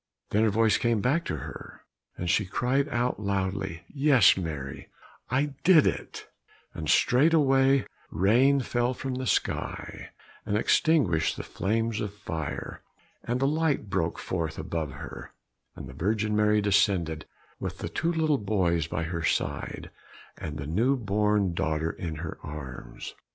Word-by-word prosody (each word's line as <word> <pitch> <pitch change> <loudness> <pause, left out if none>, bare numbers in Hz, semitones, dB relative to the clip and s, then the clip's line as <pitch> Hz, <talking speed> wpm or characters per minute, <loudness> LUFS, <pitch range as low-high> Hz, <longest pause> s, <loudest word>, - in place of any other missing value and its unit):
Then 105 - +3
her - - +4
voice 110 +1 +3
came 120 -2 +1
back 145 +10 +1
to - - -2
her, - - -10 0.4
and 90 - -4
she 105 - +3
cried 130 +8 0
out 120 -2 -1
loudly, 95 -3 -2
"Yes, 140 -6 +5
Mary, 75 -7 -5 0.4
I 140 +3 0
did 175 -5 +6
it;" - - -3 0.5
and 75 -2 -5
straight 150 +7 +4
way 135 -2 +4 0.2
rain 120 - +3
fell 120 +1 0
from 135 +1 -4
the 130 0 -3
sky - - -2 0.3
and 105 - 0
extinguished 110 - +2
the - - -5
flames 115 +2 -1
of 105 -1 -4
fire, 80 -6 -5 0.4
and 125 +3 -1
a - - +4
light 145 -8 0
broke 85 -4 0
forth 85 -4 -3
above 80 -5 -3
her, 70 - -9 0.4
and - - -8
the 65 - -10
Virgin 105 +7 0
Mary 105 0 +3
descended 95 -6 +1 0.3
with - - -4
the - - -4
two 165 - -1
little 155 -7 +1
sons 90 -6 +1
by 80 -1 -2
her 85 +1 -3
side, - - -2 0.4
and 75 0 -6
the 70 - -5
new 115 - +2
born 105 -3 +1
daughter 80 -1 -1
in 80 -3 -5
her 80 +1 -6
arms. 70 -5 -8
105 Hz, 150 wpm, -27 LUFS, 85-130 Hz, 0.5 s, did